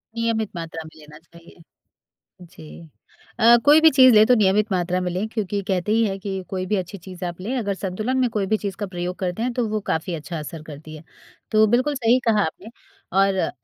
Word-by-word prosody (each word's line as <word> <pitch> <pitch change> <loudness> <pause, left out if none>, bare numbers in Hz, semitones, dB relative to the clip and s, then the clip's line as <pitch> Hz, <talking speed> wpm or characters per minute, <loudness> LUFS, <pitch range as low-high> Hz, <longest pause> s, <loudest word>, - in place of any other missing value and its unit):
नियमित 230 -2 -1
मात्रा 165 -1 -6
में 160 0 -15
लेना 150 0 -14
चाहिए। 170 +1 -19 0.8
जी। 165 -1 -13 0.5
अ, 235 +1 +7
कोई 300 +2 +7
भी 320 - +8
चीज़ 260 -2 +7
लें 215 0 +7
तो 250 - +5
नियमित 210 +1 +2
मात्रा 180 0 0
में 180 - -2
लें 185 +5 -2
क्योंकि 205 -3 -3
कहते 190 +1 -1
ही 225 +1 +3
है 195 -1 -2
कि 190 -1 -4
कोई 185 -1 -3
भी 210 - -1
अच्छी 190 +1 -4
चीज़ 185 0 -11
आप 175 0 -6
लें 245 +7 -3
अगर 205 -5 -1
संतुलन 215 +7 -3
में 250 -2 +2
कोई 210 -3 -2
भी 215 - +1
चीज़ 200 -3 -5
का 205 - -3
प्रयोग 180 0 -5
करते 185 +3 -3
हैं, 250 - -1
तो 240 -3 -1
वो 215 0 -1
काफ़ी 160 +2 -2
अच्छा 165 +1 -6
असर 155 +1 -8
करती 155 +1 -11
है। 155 - -12 0.5
तो 215 0 +5
बिल्कुल 255 +6 +1
सही 245 -1 +3
कहा 215 -2 +3
आपने, 180 +6 -6 0.4
और 195 0 +1
195 Hz, 220 wpm, -22 LUFS, 175-220 Hz, 0.8 s, भी